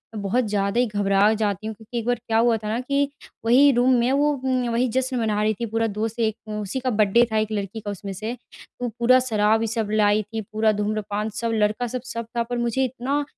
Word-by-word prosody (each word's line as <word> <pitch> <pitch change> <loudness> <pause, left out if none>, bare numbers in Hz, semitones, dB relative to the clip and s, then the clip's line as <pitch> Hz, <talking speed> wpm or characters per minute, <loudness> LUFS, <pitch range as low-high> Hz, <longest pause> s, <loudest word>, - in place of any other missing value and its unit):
मैं 210 - -4
बहुत 240 +5 +1
ज़्यादा 200 +2 0
ही 250 - +4
घबरा 205 0 +2
जाती 215 -1 -2
हूँ। 220 - -5
क्योंकि 220 +3 -8
एक 225 - -6
बार 245 - +2
क्या 225 0 +2
हुआ 230 0 +3
था 215 -1 -7
ना 225 +3 -1
कि 280 +2 0 0.4
वही 265 +5 +6
रूम 250 +1 +3
में 245 +2 +2
वो 290 +2 +3
उम, 255 -2 0
वही 240 +2 +1
जश्न 260 +2 -1
मना 215 -2 0
रही 215 0 +2
थी 235 - -1
पूरा 225 +1 0
दोस्त 215 +2 -3
एक 220 -2 +1 0.2
उसी 210 +6 -3
का 255 - -1
बर्थडे 215 +1 +4
था 220 - +1
1 215 0 0
लड़की 205 +1 -3
का 205 -1 -5
उसमें 195 0 -6
से। 215 +6 -4 0.4
तो 245 - -2
पूरा 255 +2 +5
शराब 220 -3 +2
ये 225 - 0
सब 220 -1 -2
लाई 210 0 +3
थी, 220 +2 -5
पूरा 215 +1 +1
धूम्रपान, 210 0 -2
सब 230 +2 -3
लड़का 215 +3 +1
सब, 250 +2 -4
सब 230 -2 -5
था। 235 - +2
पर 245 +1 -4
मुझे 240 +2 0
इतना 270 +3 -2
225 Hz, 240 wpm, -23 LUFS, 210-245 Hz, 0.4 s, वही